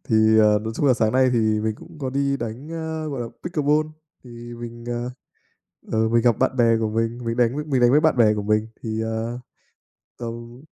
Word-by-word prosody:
Thì, 110 Hz, -1 st, +4 dB
ờ, 105 Hz, -1 st, +5 dB
nói 110 Hz, +1 st, -5 dB
chung 145 Hz, -, +1 dB
là 130 Hz, -, +5 dB
sáng 110 Hz, -2 st, +1 dB
nay 130 Hz, 0 st, +4 dB
thì 110 Hz, -2 st, +2 dB
mình 110 Hz, 0 st, -1 dB
cũng -, -, -14 dB
có 135 Hz, -3 st, -3 dB
đi 140 Hz, +1 st, 0 dB
đánh, 120 Hz, +3 st, -6 dB
ơ, 160 Hz, -1 st, -4 dB
gọi 140 Hz, -4 st, -4 dB
là, 120 Hz, -, -3 dB, 0.2 s
Pickleball. 155 Hz, -3 st, +1 dB, 0.4 s
Thì 120 Hz, -1 st, -10 dB
mình, 120 Hz, 0 st, -9 dB
ờ, 120 Hz, +1 st, -3 dB, 0.8 s
ờ, 110 Hz, 0 st, +2 dB
mình 115 Hz, 0 st, +3 dB
gặp 120 Hz, -3 st, +3 dB
bạn 130 Hz, 0 st, +1 dB
bè 115 Hz, -2 st, +4 dB
của 110 Hz, -1 st, 0 dB
mình, 115 Hz, +2 st, -1 dB
mình 115 Hz, +1 st, -2 dB
đánh 120 Hz, +1 st, +2 dB
với 150 Hz, +1 st, -3 dB
mình 135 Hz, -4 st, 0 dB
đánh 120 Hz, 0 st, +5 dB
với 145 Hz, -, +6 dB
bạn 160 Hz, -4 st, +3 dB
bè 110 Hz, -3 st, +5 dB
của 105 Hz, -1 st, -3 dB
mình 105 Hz, +1 st, +1 dB, 0.2 s
thì, 110 Hz, -1 st, -2 dB
ờ, 110 Hz, +2 st, -3 dB, 0.8 s
tầm 120 Hz, +1 st, -7 dB
120 Hz, 225 wpm, -23 LUFS, 110-130 Hz, 0.8 s, với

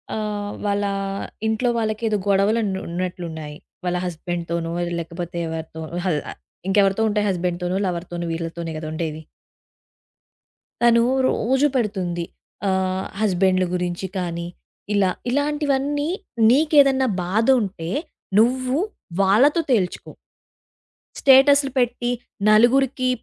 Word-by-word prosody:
ఆహ్, 210 Hz, -1 st, -3 dB
వాళ్ళ 205 Hz, 0 st, 0 dB, 0.6 s
ఇంట్లో 220 Hz, +3 st, +1 dB
వాళ్ళకి 215 Hz, 0 st, -2 dB
ఏదో 215 Hz, -1 st, +1 dB
గొడవలు 200 Hz, +3 st, +3 dB
ఆన్ 205 Hz, -, -1 dB, 0.2 s
ఉన్నట్లున్నాయి. 170 Hz, -4 st, -5 dB, 0.3 s
వాళ్ళ 180 Hz, 0 st, 0 dB
హస్బెండ్‌తోనో 170 Hz, -1 st, -3 dB, 0.3 s
లేకపోతే 170 Hz, +1 st, -6 dB
ఎవరితో, 160 Hz, 0 st, -6 dB, 0.2 s
హ -, -, +1 dB, 0.6 s
ఇంకా 195 Hz, -, +1 dB
ఎవరితో 195 Hz, +3 st, +2 dB
ఉంటాయి 210 Hz, 0 st, 0 dB
హస్బెండ్‌తోనో, 180 Hz, 0 st, -1 dB
లవర్‌తోనో 175 Hz, -1 st, -4 dB
వీళ్ళతోనే 165 Hz, 0 st, -4 dB
కదా! 155 Hz, 0 st, -6 dB
ఉండేది. 160 Hz, -1 st, -4 dB, 1.6 s
తను 235 Hz, -1 st, +5 dB, 0.3 s
రోజు 265 Hz, +5 st, +2 dB
పెడుతుంది. 185 Hz, -7 st, -1 dB, 0.4 s
ఆహ్, 190 Hz, 0 st, 0 dB, 0.2 s
హస్బెండ్లు 185 Hz, -2 st, +2 dB
గురించి 180 Hz, +1 st, -2 dB
కానీ, 170 Hz, -1 st, -3 dB, 0.5 s
ఇలా 195 Hz, -2 st, +3 dB, 0.2 s
ఇలాంటివన్నీ 290 Hz, +1 st, 0 dB, 0.4 s
నీకేదన్నా 275 Hz, -1 st, +4 dB, 0.2 s
బాధ 210 Hz, +6 st, 0 dB
ఉంటే 180 Hz, -5 st, -4 dB, 0.5 s
నువ్వు 255 Hz, +3 st, +2 dB, 0.4 s
వాళ్ళతో 250 Hz, -, +4 dB
తేల్చుకో. 195 Hz, -7 st, 0 dB, 1.1 s
స్టేటసులు 275 Hz, +1 st, +6 dB
పెట్టి 245 Hz, 0 st, 0 dB, 0.4 s
నలుగురికి 255 Hz, +4 st, +4 dB
195 Hz, 100 wpm, -22 LUFS, 175-245 Hz, 1.6 s, స్టేటసులు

